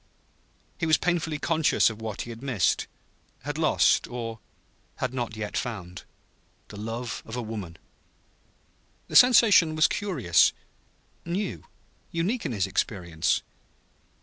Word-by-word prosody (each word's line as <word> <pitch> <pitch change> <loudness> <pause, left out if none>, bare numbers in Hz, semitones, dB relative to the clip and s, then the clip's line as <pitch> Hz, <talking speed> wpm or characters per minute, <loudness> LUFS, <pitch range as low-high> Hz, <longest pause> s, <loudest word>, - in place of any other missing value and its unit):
He 165 - 0
was 155 - +5
painfully 165 -3 -1
conscious 160 -5 +2
of 110 0 -11
what 110 -2 -4
he 120 - -8
had 115 0 -10
missed, 130 -9 0 0.6
had 145 +3 -4
lost 155 - +3
or 115 -2 -6 0.6
had 130 -1 -3
not 120 -3 -3
yet 105 -1 -5
found: 90 -7 -5 0.6
the - - -10
love 115 +3 -5
of 110 - -8
woman. 110 -8 -6 1.3
The - - -6
sensation 215 -10 +7
was 155 +1 +4
curious 135 - +2 0.7
new, 180 +3 -4 0.4
unique 185 +5 -1
in - - -4
his 100 -4 0
experience. 85 - -1
120 Hz, 120 wpm, -26 LUFS, 110-160 Hz, 1.3 s, sensation